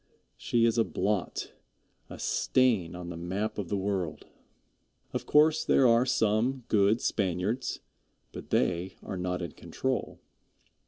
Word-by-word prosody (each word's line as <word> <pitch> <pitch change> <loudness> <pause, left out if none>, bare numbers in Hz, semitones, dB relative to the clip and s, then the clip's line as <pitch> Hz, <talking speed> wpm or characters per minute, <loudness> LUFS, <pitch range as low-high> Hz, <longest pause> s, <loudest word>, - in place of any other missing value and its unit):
She 115 -1 +1
is 115 0 +2
a - - +5
blot, 105 -4 -2 0.6
a - - -8
stain 110 -10 +1
on 90 -1 -7
the 85 - -6
map 95 +6 -3
of 95 -5 -4
the 100 - 0
world. 95 -4 -2 0.9
Of - - -3
course 155 +1 +4
there 130 - +4
are 120 +2 +4
some 120 +2 +1
good 105 +1 +3
Spaniards, 100 +5 -1 0.5
but - - -9
they 90 +1 0
are 95 - -5
not 90 0 -2
in 85 - -5
control. - - -3
100 Hz, 140 wpm, -29 LUFS, 90-115 Hz, 0.9 s, a